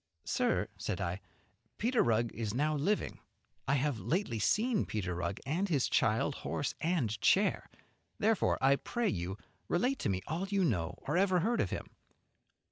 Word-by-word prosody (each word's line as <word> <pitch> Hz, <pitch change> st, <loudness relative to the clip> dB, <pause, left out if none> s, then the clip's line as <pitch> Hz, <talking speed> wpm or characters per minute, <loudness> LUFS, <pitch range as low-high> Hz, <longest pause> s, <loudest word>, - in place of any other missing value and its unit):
"Sir," -, -, +1 dB
said 95 Hz, -, -3 dB
I, 90 Hz, +1 st, -2 dB, 0.6 s
"Peter 240 Hz, +2 st, +2 dB
Rugg 115 Hz, 0 st, +1 dB
is 110 Hz, -1 st, -3 dB
now 150 Hz, +4 st, +1 dB
living. 195 Hz, +9 st, 0 dB, 0.5 s
I 135 Hz, -, +3 dB
have 140 Hz, -3 st, 0 dB
lately 160 Hz, -, -1 dB
seen 220 Hz, -, +2 dB
Peter 95 Hz, -4 st, -3 dB
Rugg 90 Hz, +4 st, -3 dB
and 175 Hz, +8 st, 0 dB
his 145 Hz, -7 st, +2 dB
child, -, -, +2 dB
horse -, -, -2 dB
and 130 Hz, -, 0 dB
chair; -, -, +3 dB, 0.5 s
therefore 220 Hz, -1 st, +2 dB
I 135 Hz, +1 st, +5 dB
pray 240 Hz, -, -1 dB
you 90 Hz, +1 st, -3 dB
to -, -, -24 dB, 0.2 s
relate 250 Hz, +9 st, +1 dB
to -, -, -1 dB
me 95 Hz, -1 st, -1 dB
all 170 Hz, +5 st, -2 dB
you 200 Hz, -1 st, +1 dB
know 90 Hz, -, 0 dB
or 150 Hz, +5 st, 0 dB
ever 185 Hz, -2 st, +3 dB
heard 230 Hz, +5 st, +1 dB
of -, -, -1 dB
him." -, -, -4 dB
145 Hz, 170 wpm, -33 LUFS, -, 0.6 s, I